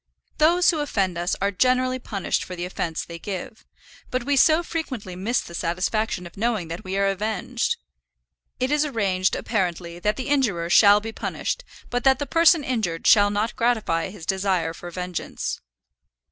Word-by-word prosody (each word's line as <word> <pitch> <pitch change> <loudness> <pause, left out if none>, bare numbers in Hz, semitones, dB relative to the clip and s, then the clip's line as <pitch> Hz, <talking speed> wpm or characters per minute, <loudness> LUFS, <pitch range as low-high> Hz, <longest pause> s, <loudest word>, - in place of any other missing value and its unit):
Those 345 +4 +5
who 320 - -2
offend 195 - 0
us 175 +1 -1
are 200 +1 +2
generally 255 +5 +2
punished 200 -6 -2
for 185 - -7
the 175 0 -4
offence 170 -3 -3
they 170 -1 -9
give; 200 +5 -6 0.5
but 255 -1 -1
we 285 +2 +1
so 315 +5 +5
frequently 260 - -5
miss 215 +7 0
the 170 - -11
satisfaction 180 +3 -1
of 175 - -11
knowing 215 -5 -1
that 165 +2 -6
we 190 +1 -3
are 200 - +2
avenged! 215 - -1 0.8
It 255 +2 0
is 295 0 +3
arranged, 195 -9 0
apparently, 175 -5 -2
that 210 +3 0
the 255 - -5
injurer 200 -12 +1
shall 205 +1 +7
be 225 +1 -5
punished, - - -3 0.3
but 245 0 -1
that 265 -1 +5
the 285 - -3
person 330 0 +4
injured 215 -11 -2
shall 205 -2 +6
not 210 +3 -1
gratify 220 -9 +1
his 185 -4 -10
desire 190 -3 0
for 175 +1 -9
vengeance. 180 0 -4
205 Hz, 175 wpm, -24 LUFS, 180-255 Hz, 0.8 s, shall